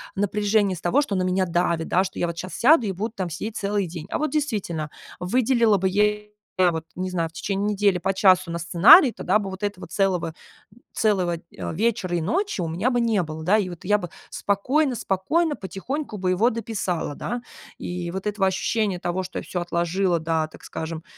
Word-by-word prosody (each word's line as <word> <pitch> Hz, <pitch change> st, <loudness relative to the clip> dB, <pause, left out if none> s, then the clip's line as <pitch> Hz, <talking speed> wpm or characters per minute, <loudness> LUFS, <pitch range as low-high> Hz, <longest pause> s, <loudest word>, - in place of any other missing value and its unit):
напряжения 205 Hz, 0 st, +1 dB
с 165 Hz, -, -10 dB
того, 220 Hz, +12 st, +3 dB
что 245 Hz, -9 st, -2 dB
на 185 Hz, -, +1 dB
меня 185 Hz, +1 st, +1 dB
давит, 170 Hz, -1 st, 0 dB
да, 185 Hz, -, +3 dB
что 190 Hz, -, -6 dB
я 175 Hz, -, +1 dB
вот 170 Hz, 0 st, -5 dB
сейчас 185 Hz, +1 st, -6 dB
сяду 265 Hz, -2 st, +5 dB
и 195 Hz, -, -1 dB
буду 210 Hz, +5 st, -4 dB
там 180 Hz, -3 st, -3 dB
сидеть 210 Hz, +6 st, -5 dB
целый 200 Hz, -2 st, -1 dB
день. 165 Hz, -2 st, -7 dB
А -, -, -1 dB
вот 305 Hz, -, 0 dB
действительно, 205 Hz, -, -2 dB, 0.3 s
выделила 230 Hz, +2 st, +3 dB
бы 190 Hz, -, +1 dB
я, 210 Hz, +2 st, +2 dB, 0.5 s
вот 160 Hz, 0 st, -4 dB
не 185 Hz, +1 st, -3 dB
знаю, 165 Hz, -3 st, -1 dB
в -, -, -26 dB
течение 200 Hz, +3 st, -2 dB
недели 200 Hz, -3 st, +2 dB
по 195 Hz, +2 st, 0 dB
часу 185 Hz, -2 st, +4 dB
на 170 Hz, -, -3 dB
сценарий, 225 Hz, -, +7 dB
тогда 215 Hz, -, +1 dB
бы 195 Hz, -2 st, -4 dB
вот 190 Hz, +2 st, -8 dB
этого 205 Hz, -2 st, -3 dB
целого 180 Hz, -5 st, 0 dB, 0.6 s
целого, 185 Hz, -6 st, +1 dB, 0.2 s
а, -, -, -4 dB
вечера 190 Hz, -3 st, 0 dB
и -, -, -1 dB
ночи 365 Hz, -, -1 dB
у 165 Hz, -, -2 dB
меня 180 Hz, +10 st, 0 dB
бы 245 Hz, -, +1 dB
не 220 Hz, -6 st, +2 dB
было, 155 Hz, 0 st, -7 dB
да. 205 Hz, +4 st, +4 dB
И 190 Hz, -4 st, -1 dB
вот 175 Hz, 0 st, -10 dB
я 210 Hz, +2 st, +4 dB
бы 175 Hz, -5 st, -6 dB, 0.2 s
спокойно-спокойно, 260 Hz, -, 0 dB
потихоньку 215 Hz, +6 st, -5 dB
бы 185 Hz, -1 st, 0 dB
его 220 Hz, +7 st, +3 dB
дописала, 205 Hz, -9 st, -3 dB
да. 240 Hz, +9 st, -4 dB, 0.4 s
И 175 Hz, -1 st, -4 dB
вот 190 Hz, +2 st, -4 dB
этого 205 Hz, -2 st, +1 dB
ощущения 195 Hz, 0 st, 0 dB
того, 175 Hz, +2 st, -2 dB
что 185 Hz, -, -5 dB
я -, -, -8 dB
всё 180 Hz, -, -3 dB
отложила, 175 Hz, +1 st, 0 dB
да, 160 Hz, -1 st, 0 dB
так -, -, -16 dB
скажем, 160 Hz, 0 st, -5 dB
190 Hz, 205 wpm, -24 LUFS, 175-215 Hz, 0.6 s, сценарий